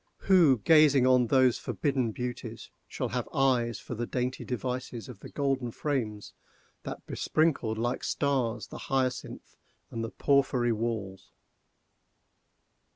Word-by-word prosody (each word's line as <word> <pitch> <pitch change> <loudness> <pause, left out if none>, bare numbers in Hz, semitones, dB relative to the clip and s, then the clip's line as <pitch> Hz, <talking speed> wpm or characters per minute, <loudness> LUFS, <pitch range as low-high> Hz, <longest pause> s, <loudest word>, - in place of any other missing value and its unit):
—who, 170 -9 +5
gazing 150 -5 +6
on 125 -2 +4
those 130 -1 +3
forbidden 135 -5 -1
beauties, 120 -1 -6 0.2
shall - - -3
have - - -3
eyes 125 -4 +1
for - - -7
the 120 +1 -3
dainty 125 +1 -2
devices 125 -1 -4
of 125 -6 -10
the - - -10
golden 135 -3 -1
frames 115 -6 -3 0.5
that - - -7
besprinkled, 140 -9 0
like 120 +2 -2
stars, 125 -6 -1
the - - -8
hyacinth 130 -2 -2 0.4
and 115 - -4
the 115 - -3
porphyry 135 -4 +2
walls? 110 -4 -3
125 Hz, 125 wpm, -29 LUFS, 115-135 Hz, 0.5 s, gazing